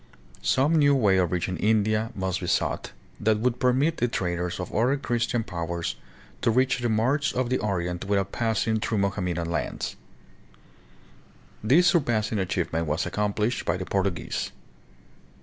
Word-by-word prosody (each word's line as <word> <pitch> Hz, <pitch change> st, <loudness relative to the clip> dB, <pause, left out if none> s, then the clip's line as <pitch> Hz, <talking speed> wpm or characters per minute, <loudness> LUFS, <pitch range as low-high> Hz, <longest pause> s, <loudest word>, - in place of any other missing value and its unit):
Some 150 Hz, +5 st, +3 dB
new 145 Hz, -2 st, +5 dB
way 105 Hz, -7 st, +3 dB
of 90 Hz, -3 st, +2 dB
reaching 90 Hz, 0 st, -1 dB
India 110 Hz, +1 st, +2 dB
must 95 Hz, -1 st, -2 dB
be 90 Hz, -, -5 dB
sought, -, -, 0 dB, 0.3 s
that 110 Hz, 0 st, +2 dB
would 125 Hz, +2 st, 0 dB
permit 135 Hz, +6 st, +2 dB
the 120 Hz, -, +1 dB
traders 90 Hz, -5 st, -2 dB
of 90 Hz, -, -5 dB
other 125 Hz, +5 st, +2 dB
Christian 120 Hz, -3 st, -1 dB
powers 85 Hz, -4 st, -3 dB, 0.5 s
to -, -, +2 dB
reach 130 Hz, +3 st, +2 dB
the 120 Hz, -1 st, 0 dB
marts 130 Hz, +7 st, +1 dB
of 125 Hz, -1 st, -1 dB
the 130 Hz, -, +2 dB
Orient 90 Hz, -3 st, -2 dB
without 100 Hz, -1 st, 0 dB
passing 110 Hz, -1 st, 0 dB
through 110 Hz, 0 st, -1 dB
Mohammedan 90 Hz, -4 st, -1 dB
lands. 85 Hz, -, -3 dB, 1.7 s
This 145 Hz, +12 st, +5 dB
surpassing 115 Hz, -, +2 dB
achievement 85 Hz, -3 st, -1 dB
was 75 Hz, +4 st, 0 dB
accomplished 105 Hz, +3 st, -1 dB
by 85 Hz, -, 0 dB
the 95 Hz, -, -5 dB
Portuguese. 95 Hz, -3 st, -2 dB
105 Hz, 150 wpm, -26 LUFS, 90-120 Hz, 1.7 s, new